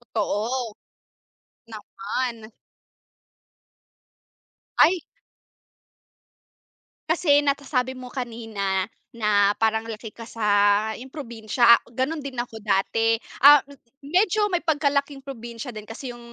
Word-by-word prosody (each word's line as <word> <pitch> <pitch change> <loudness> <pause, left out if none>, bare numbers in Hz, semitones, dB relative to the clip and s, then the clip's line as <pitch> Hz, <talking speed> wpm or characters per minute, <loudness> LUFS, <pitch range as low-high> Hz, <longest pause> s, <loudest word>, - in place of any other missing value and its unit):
Totoo. 225 +3 -1 1.0
Naman. 220 +1 -5 2.3
Ay. 360 0 +5 2.1
Kasi 295 -4 +3
natasabi 275 -2 0
mo 255 -1 -9
kanina, 225 -6 -3 0.3
na 205 -2 +3
parang 220 0 0
laki 220 -1 -7
ka 230 0 -11
sa 225 - -7 0.6
yun 260 - -9
probinsya, 235 -3 +3 0.2
ganun 285 +6 -1
din 275 -2 -7
ako 240 -2 -5
dati. 220 +2 +1 0.2
Ah, 285 +1 +8 0.4
medyo 395 +6 +2
may 355 - +1
pagka-laking 285 -3 0
probinsya 240 -2 -7
din 215 -2 -10
kasi 245 +3 -7
yung 240 - -12
240 Hz, 95 wpm, -24 LUFS, 220-280 Hz, 2.3 s, Ah